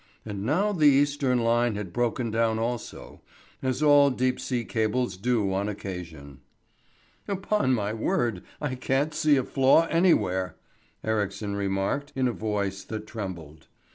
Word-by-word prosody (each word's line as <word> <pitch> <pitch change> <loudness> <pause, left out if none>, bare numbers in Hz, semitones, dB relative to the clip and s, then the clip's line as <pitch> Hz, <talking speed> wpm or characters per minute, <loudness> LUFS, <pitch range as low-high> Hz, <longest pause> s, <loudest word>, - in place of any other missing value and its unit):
And 100 -2 -5
now 180 - +1
the 160 -7 +4
Eastern 140 -2 +3
line 120 -1 +2
had 100 -4 -6
broken 120 0 -1
down 115 0 +1
also, 115 0 -5 0.4
as 130 +2 -1
all 145 -1 +6
deep 130 -1 0
sea 120 -3 -2
cables 110 -1 -1
do 105 -1 0
on 100 +2 -1
occasion. 85 -9 -7 0.9
"Upon 195 -8 +1
my 105 -2 -2
word, 110 -2 -1 0.2
I 145 -3 -2
can't 135 +4 0
see 150 -1 +3
a 130 - +1
flaw 135 +6 +4
anywhere," 95 - +2 0.5
Ericsson 105 -1 -2
remarked, 100 +9 -2
in 130 -1 +1
a 120 - -1
voice 100 -3 -2
that 110 -1 -6
trembled. 85 -9 -7
115 Hz, 140 wpm, -26 LUFS, 100-135 Hz, 0.9 s, all